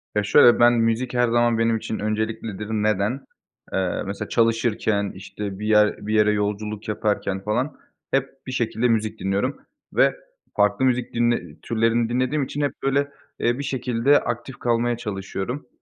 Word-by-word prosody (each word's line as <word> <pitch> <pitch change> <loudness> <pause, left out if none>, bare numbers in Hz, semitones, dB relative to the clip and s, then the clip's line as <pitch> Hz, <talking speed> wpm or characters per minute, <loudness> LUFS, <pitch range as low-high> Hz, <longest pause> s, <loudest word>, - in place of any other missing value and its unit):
Ya 105 - +2
şöyle, 120 +3 +6
ben 120 0 +6
müzik 115 +2 0
her 125 0 +3
zaman 120 0 +2
benim 115 0 +2
için 110 - -5
önceliklidir. 110 -1 -3
Neden? 110 +3 0 0.5
Eee, 95 -2 -1
mesela 100 +2 -5
çalışırken, 115 -3 +1
işte, 100 +1 -7
bir 105 - -3
yer 105 -1 +3
bir 110 - -1
yere 105 -1 +4
yolculuk 105 +1 -2
yaparken 105 -2 -1
falan, 125 +7 -1 0.3
hep 135 0 +1 0.2
bir - - -4
şekilde 120 -1 0
müzik 110 -1 0
dinliyorum. 100 +8 -1 0.3
Ve - - +4 0.4
farklı 105 +4 +2
müzik 125 -1 0
dinle 120 0 0
türlerini 115 0 +1
dinlediğim 130 +4 0
için, 145 +2 -4
hep 140 -2 0
böyle, 140 +1 +1 0.3
eee, 120 +2 +1
bir - - -3
şekilde 130 +1 +2
aktif 135 - -5
kalmaya 120 0 +1
çalışıyorum. 105 +4 -5
115 Hz, 155 wpm, -23 LUFS, 105-125 Hz, 0.5 s, şöyle